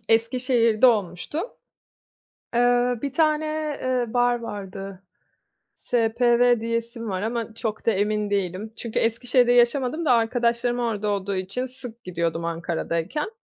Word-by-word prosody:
Eskişehir'de 230 0 +3
olmuştu. 205 - 0 1.2
Eee, 245 0 +3
bir 280 -2 -2
tane, 310 0 +2 0.4
eee, 255 -1 +1
bar 245 0 +3
vardı. 195 -3 -7 0.7
SPV 240 0 +2
diyesim 230 0 -3
var 185 0 -2
ama 230 0 -3
çok 220 -1 -4
da 230 - +4
emin 210 +1 0
değilim 200 +2 -2
çünkü 230 -2 -3
Eskişehir'de 245 +2 +2
yaşamadım 250 +6 +2
da 270 - +4
arkadaşlarım 235 +1 +1
orada 215 -3 -1
olduğu 200 -1 -1
için 195 +7 -2
sık 250 -2 -10
gidiyordum 170 -2 -2
Ankara'dayken. 170 - -2
230 Hz, 120 wpm, -24 LUFS, 205-245 Hz, 1.2 s, da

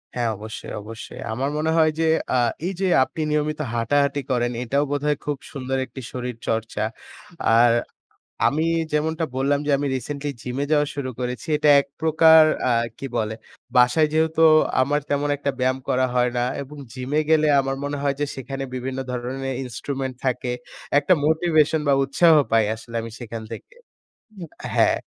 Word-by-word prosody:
হ্যাঁ 120 -2 0
অবশ্যই, 110 +2 -8
অবশ্যই। 110 +2 -9
আমার 135 +5 -1
মনে 160 +1 0
হয় 155 -1 +4
যে, - - +2 0.3
আ - - +4 0.3
এই 190 - -1
যে 190 - +2 0.2
আপনি 160 - -5
নিয়মিত 150 0 0
হাঁটাহাঁটি 140 +5 +1
করেন 120 -1 +1
এটাও 140 +4 +1
বোধহয় 145 0 0
খুব 145 -1 -1
সুন্দর 135 -2 -3
একটি 130 - -10
শরীর 125 -1 -4
চর্চা। 110 -1 -1 0.8
আর 120 0 +6 0.7
আমি 155 +3 0 0.3
যেমনটা 160 +2 0
বললাম 140 +2 +1
যে, 145 - +1
আমি 145 - -1
রিসেন্টলি 140 +3 -4
জিমে 130 +3 -2
যাওয়া 150 -1 +3
শুরু 140 -3 -3
করেছি। 125 +4 -4
এটা 150 - +3
এক - - -16
প্রকার 160 0 +6 0.3
আ - - +3 0.3
কি - - -6
বলে, 110 0 -1 0.4
বাসায় 125 +5 +5
যেহেতু 160 +1 +2 0.4
আমার 145 +3 +1
তেমন 145 0 0
একটা 140 0 -1
ব্যায়াম 130 +1 +1
করা 130 0 +2
হয় 125 0 +2
না 120 - +2 0.2
এবং 145 +2 -10 0.2
জিমে 130 +4 -1
গেলে 155 -1 +4
আমার 135 0 -1
মনে 145 0 -3
হয় 140 -1 +1
যে 145 - +1
সেখানে 135 +1 -5
বিভিন্ন 130 +1 -4
ধরনের 130 +2 -3
ইন্সট্রুমেন্ট 130 +1 -4
থাকে। 125 -1 -1 0.5
একটা 150 +5 +3
মোটিভেশন 160 -1 +2
বা 140 - +5
উৎসাহ 160 +5 +4 0.2
পাই 115 -1 +4
আসলে 115 +1 -11
আমি 115 0 -7
সেখান 115 -2 -6
থেকে - - -9 1.0
হ্যাঁ। - - +3
140 Hz, 165 wpm, -23 LUFS, 125-150 Hz, 1.0 s, আর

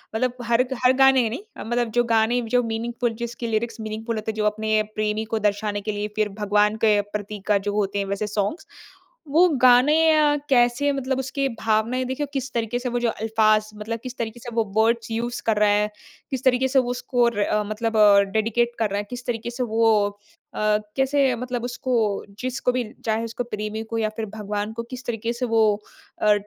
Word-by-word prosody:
मतलब 250 +2 0
हर 235 +1 +3
ग - - -6
हर 255 - +6
गाने 265 -3 +5
नहीं 255 - -6
अ, - - -6
मतलब 240 0 -1
जो - - +5
गाने 225 +2 +3
जो 245 +2 +1
मीनिंगफुल 235 +1 -2
जिसकी 235 0 -4
लिरिक्स 225 +1 -2
मीनिंगफुल 220 +2 -4
होते 220 0 -3
हैं, - - -13
जो 210 -1 -1
अपने 215 0 +1
प्रेमी 215 +1 -1
को 225 0 -2
दर्शाने 205 0 -1
के 215 +1 -3
लिए, 205 0 -3
फिर 215 -1 +1
भगवान 210 +1 +3
के 210 -1 +4
प्रतीक 205 0 -7
का 205 -1 +4
जो 205 +1 -3
होते 200 -1 0
हैं, 200 - -1
वैसे 200 +2 -2
सॉन्ग्स। 210 - -2 0.6
वो 345 +4 +6
गाने 255 +4 +6 0.2
अ, 295 -1 +4
कैसे 245 +3 +3
मतलब 265 -1 -2
उसके 270 +1 -1
भावनाएँ 225 +4 +1
देखिए 260 +3 -2
किस 270 -1 -3
तरीके 235 +1 -1
से 250 - -3
वो 245 0 -1
जो 240 -1 +1
अल्फाज़ 215 -1 +2
मतलब 220 +2 -5
किस 255 0 -7
तरीके 230 0 -4
से 240 +1 -8
वो 230 - +3
वर्ड्स 230 +1 +2
यूज़ 235 +2 -3
कर 220 -2 +2
रहा 210 0 +4
है, 210 +1 +3 0.4
किस 265 0 -3
तरीके 260 0 +3
से 265 +1 +3
वो 245 -1 0
स्कोर 240 -2 0
अ, 210 +1 +1
मतलब 215 +2 -2
अ, 205 -1 +7
डेडिकेट 230 +2 +1
कर 220 - +1
रहा 200 - -2
है, - - -2
किस 245 0 -7
तरीके 235 -1 -3
से 245 +1 -3
वो 225 -1 +2 0.7
अ, 215 0 +2 0.2
कैसे 270 -1 +2
मतलब 245 0 -4
उसको 240 -4 -1
जिसको 255 0 -1
भी 250 -1 -1 0.2
चाहे 220 +1 0
उसको, 230 +2 -4
प्रेमी 215 -1 -4
को 225 0 -5
या 215 -1 +1
फिर 225 - -2
भगवान 210 0 -3
को 235 +1 -5
किस 255 -1 -7
तरीके 230 0 -2
से 250 +1 -2
वो 225 -1 +2 0.6
अ, 210 -1 +5
225 Hz, 210 wpm, -23 LUFS, 215-245 Hz, 0.7 s, अ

